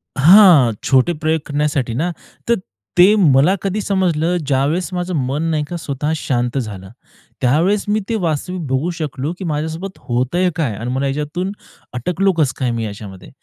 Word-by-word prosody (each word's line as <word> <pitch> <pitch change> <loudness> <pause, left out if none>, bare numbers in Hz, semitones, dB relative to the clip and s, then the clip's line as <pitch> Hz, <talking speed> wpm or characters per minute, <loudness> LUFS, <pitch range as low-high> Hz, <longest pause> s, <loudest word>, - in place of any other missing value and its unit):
हां, 165 - +7
छोटे 135 +6 +3
प्रयोग 155 0 -1
करण्यासाठी 145 -4 -1
ना 170 +6 -1 0.4
तर 235 - +5 0.4
ते 185 +4 +7
मला 155 -2 +4
कधी 200 +2 -2
समजलं 180 -4 0
ज्यावेळेस 145 +6 0
माझं 180 0 -3
मन 140 +5 -2
नाही 155 -2 0
का 175 - -4
स्वतः 150 -1 -3
शांत 125 -3 -1
झालं. 100 -7 -5 0.5
त्यावेळेस 165 +11 +2
मी 210 +1 +1
ते 230 - 0
वास्तविक 175 +1 -2
बघू 135 +6 0
शकलो 145 +1 -3
की - - -5
माझ्यासोबत 160 +5 -4
होत 125 +6 -2
आहे 180 0 +3
काय 145 -10 -1
आणि 115 +4 -4
मला 135 +2 -1
याच्यातून 150 +7 -3 0.4
अटकलो 180 +10 0
कसं 140 -6 +2
काय 125 -2 0
मी 115 -1 -2
याच्यामध्ये. 100 -2 -9
150 Hz, 165 wpm, -18 LUFS, 130-180 Hz, 0.5 s, हां